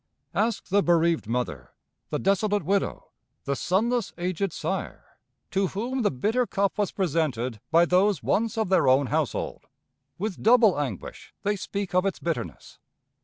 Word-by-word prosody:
Ask 215 0 -1
the 200 +2 +4
bereaved 170 - +2
mother, 125 +2 -3 0.4
the - - -1
desolate 205 +1 +1
widow, 200 0 -1 0.3
the 140 - -1
sonless 220 - 0
aged 180 +1 -1
sire, - - -5 0.3
to 195 0 +1
whom 240 +8 -3
the 210 - +3
bitter 220 - 0
cup 200 0 0
was 205 - +1
presented 140 - -1
by 165 +1 +5
those 185 +3 +2
once 225 +2 0
of 220 -4 0
their 190 - +3
own 130 +2 +5
household. - - -2 0.5
With 200 +1 -4
double 225 -6 +5
anguish 145 -3 -6
they 205 0 +1
speak 200 0 -4
of 185 +2 +3
its 195 - -2
bitterness. 115 - -5
190 Hz, 150 wpm, -26 LUFS, 165-205 Hz, 0.5 s, by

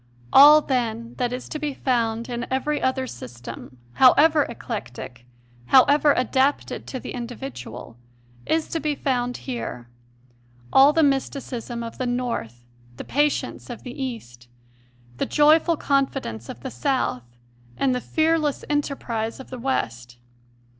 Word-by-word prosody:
All, 300 +2 +9
then, 235 -4 -2
that 245 -1 0
is 250 0 -5
to 305 - -4
be 295 -2 -3
found 230 -3 0
in 240 -1 -4
every 290 +3 0
other 260 0 0
system, 120 - -9 0.2
however 295 - +5
eclectic, 125 - -7 0.4
however 285 +2 +5
adapted 265 +3 0
to 260 - -5
the - - -7
individual, 135 - -7 0.5
is 320 0 +1
to 330 - -2
be 300 -2 -1
found 245 -3 -1
here 180 - -5 0.8
all 275 +2 +7
the 320 +1 +3
mysticism 260 -4 -2
of 230 - -8
the 255 - -1
North, 235 - -3 0.3
the - - -6
patience 295 -1 -1
of 240 - -8
the 245 - -7
East, 120 - -7 0.7
the - - -1
joyful 310 +2 +4
confi 275 -2 +1
dence 115 0 -7
of 120 - -8
the - - -6
South, 120 - -2 0.4
and 270 -2 +2
the 250 - -2
fearless 315 -1 0
enterprise 245 -6 -2
of 265 - -11
the 255 - -6
West. 120 - -3
250 Hz, 140 wpm, -23 LUFS, 225-280 Hz, 0.8 s, All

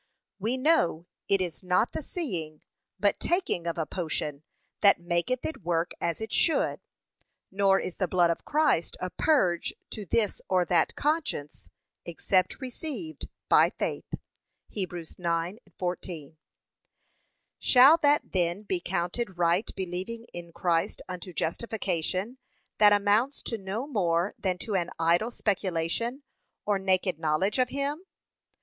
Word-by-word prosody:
We 225 +6 0
know 255 - +2 0.2
it 195 -1 +3
is 175 -3 -3
not 185 +5 +2
the - - -4
seeing, 175 - -4 0.4
but 205 -1 +2
taking 345 - 0
of 170 - -2
a 160 - 0
potion, 150 -3 -3 0.4
that 200 - +5
maketh 175 +9 -1
it 315 - -4
work 170 0 0
as 170 - -1
it 220 0 -5
should, 325 - +2 0.7
nor 195 0 +3
is 180 - -5
the 185 - 0
blood 175 -1 +3
of 170 - -4
Christ 300 - +1
a 185 0 -4
purge 185 - +2 0.2
to 210 -3 -6
this 215 +1 0
or 185 -1 +3
that 175 - +2
conscience, 295 - -2 0.3
except 185 +2 0
received 315 +5 -6 0.2
by - - +6
faith. - - -4 0.7
(Heb. 190 -4 -1
9:14) 170 - -4 1.2
Shall 270 +6 +7
that 295 -2 +2
then 175 +2 0
be 190 -3 -1
counted 180 +3 -2
right 175 +4 +2
believing 190 +6 -4
in 170 -1 -8
Christ 170 -1 0
unto 180 0 -7
justification, 190 +4 -2 0.4
that 210 -1 +8
amounts 205 +7 +2
to 230 - -2
no 195 +6 -3
more 180 - 0
than 185 -2 -1
to 210 +3 -5
an 180 -3 0
idle 170 +7 +2
speculation, 205 - -1 0.4
or 205 -2 +1
naked 185 -3 +1
knowledge 165 - +1
of 250 0 +3
him? 280 +5 -2
185 Hz, 135 wpm, -28 LUFS, 170-230 Hz, 1.2 s, that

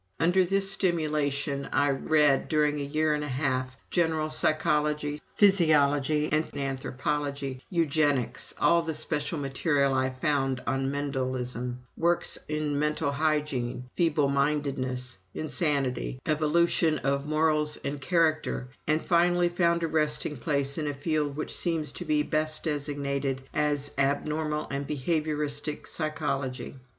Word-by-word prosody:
Under 180 +3 +4
this 195 +2 +3
stimulation, 150 -6 0
I 145 0 +2
read, 145 0 +3
during 150 -1 +2
a - - -2
year 155 +2 +1
and 150 0 -2
a - - -3
half, 130 -1 -1
general 160 -2 +1
psychology, 150 -1 +1
physiology 150 -6 +4
and 155 +1 +1
anthropology, 140 0 -3
eugenics, 150 -6 +1
all 170 0 +4
the 160 -2 -3
special 150 +1 -1
material 140 0 +1
I 130 0 +1
could 130 0 -12
find 135 -3 +1
on 135 +2 0
Mendelism, 130 -3 -3
works 170 +1 +1
on 150 -2 -1
mental 150 -1 0
hygiene, 140 -5 -1
feeblemindedness, 140 - 0 0.2
insanity, 145 -5 0
evolution 155 +1 +2
of 140 +1 -1
morals 155 -1 +2
and 140 0 -4
character, 155 -4 0 0.2
and 155 +1 +1
finally 175 0 +3
found 170 -1 +1
a - - +1
resting 150 -1 0
place 140 +2 -1
in 150 - -2
a 145 - -2
field 150 0 -1
which 155 - -2
seems 165 -3 0
to - - -6
be 150 -1 +2
best 155 0 -1
designated 140 -3 -2
as 145 -1 0
Abnormal 150 +2 0
and 140 0 -3
Behavioristic 150 0 -1
Psychology. 140 -5 -3
150 Hz, 125 wpm, -27 LUFS, 140-155 Hz, 0.2 s, Under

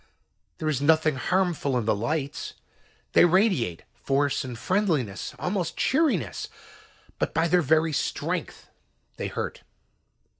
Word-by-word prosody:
There 155 - -3
is 145 -3 0
nothing 155 +1 +4
harmful 175 -4 0
in 120 - -1
the 110 - +3
lights. 140 +6 -3 0.6
They - - +7
radiate 175 - +2
force 135 +4 0
and 125 -3 -6
friendliness, 155 - -1
almost 180 -1 -2
cheeriness. 230 - +1 0.7
But - - -1
by 165 +2 +3
their 180 +1 +4
very 160 +1 +2
strength, - - -3 0.5
they - - -3
hurt. - - -4
155 Hz, 120 wpm, -26 LUFS, 130-180 Hz, 0.7 s, They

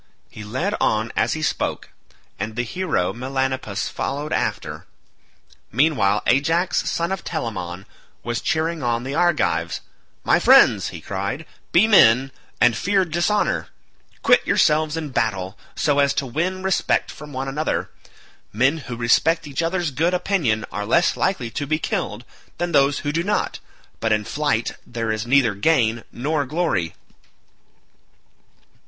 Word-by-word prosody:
He 105 - -9
led 130 - -2
on 110 +1 +1
as 115 - +1
he 155 - -4
spoke, - - -2 0.5
and 110 +1 -4
the 120 - -1
hero 150 - -1
Melanippus 130 -4 -2
followed 145 +3 -3
after. - - -3 0.8
Meanwhile 115 -6 +2
Ajax 165 +8 +2
son 170 +2 -1
of 190 - -3
Telamon 95 - -4 0.4
was 120 -1 -2
cheering 160 0 -1
on 120 -1 0
the 135 +2 -4
Argives. 150 - +1 0.4
"My - - +3
friends," - - +6
he - - -7
cried, 100 +11 -4 0.3
"be 175 +5 +5
men, 135 - +5 0.3
and 120 0 +4
fear 195 - +1
dishonour; 175 +6 0 0.6
quit - - +5
yourselves 155 0 +2
in 155 -2 -4
battle 105 -7 -1 0.2
so 145 -1 +1
as 140 0 +3
to 140 - 0
win 175 +9 -2
respect 190 -1 +1
from 150 -1 -11
one 135 0 -4
another. 150 +3 -2 0.6
Men 130 +9 +2
who 125 -4 -7
respect 160 +8 +2
each 140 +1 -3
other's 170 -1 -1
good 165 +7 +1
opinion 165 - 0
are 105 - -3
less 170 +11 +2
likely 130 -12 -1
to 145 +5 -4
be 155 +2 +1
killed - - -3 0.3
than 175 +1 -2
those 140 -2 +3
who 145 - +1
do 165 +2 0
not, 210 +3 -1 0.4
but 115 - 0
in 105 -1 +2
flight 145 -5 -1
there 115 -2 -3
is 110 +1 -3
neither 125 -4 +4
gain 115 0 +1
nor 145 +4 -1
glory." 150 - -1
140 Hz, 145 wpm, -22 LUFS, 115-165 Hz, 0.8 s, friends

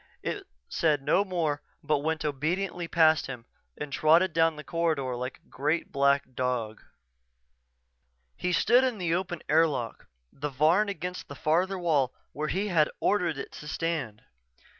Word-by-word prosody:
It 395 -3 -4 0.2
said 150 -5 +1
no 165 +7 +3
more 165 -7 -1 0.2
but 150 -1 +1
went 160 +2 -2
obediently 170 +5 -1
past 160 -2 +4
him 125 -4 -7 0.3
and 150 -1 -6
trotted 165 +3 +4
down 165 -1 +3
the 150 - -8
corridor 155 -7 -1
like 125 +1 -5
a - - -34
great, 150 +5 -1
black 140 -1 +2
dog. 120 -4 -2 1.5
He 180 - -2
stood 240 +8 +4
in 255 -4 0
the 175 -4 0
open 175 -2 -2
airlock, 150 -6 +1 0.3
the 145 +2 -4
Varn 160 +10 +3
against 180 -1 -5
the 140 - -8
farther 180 +7 +1
wall 150 -8 +1 0.2
where 150 +1 -3
he 195 +6 -1
had 160 -4 +3
ordered 175 -7 +1
it - - -6
to 150 - -10
stand. 150 -9 -3
155 Hz, 155 wpm, -28 LUFS, 140-175 Hz, 1.5 s, past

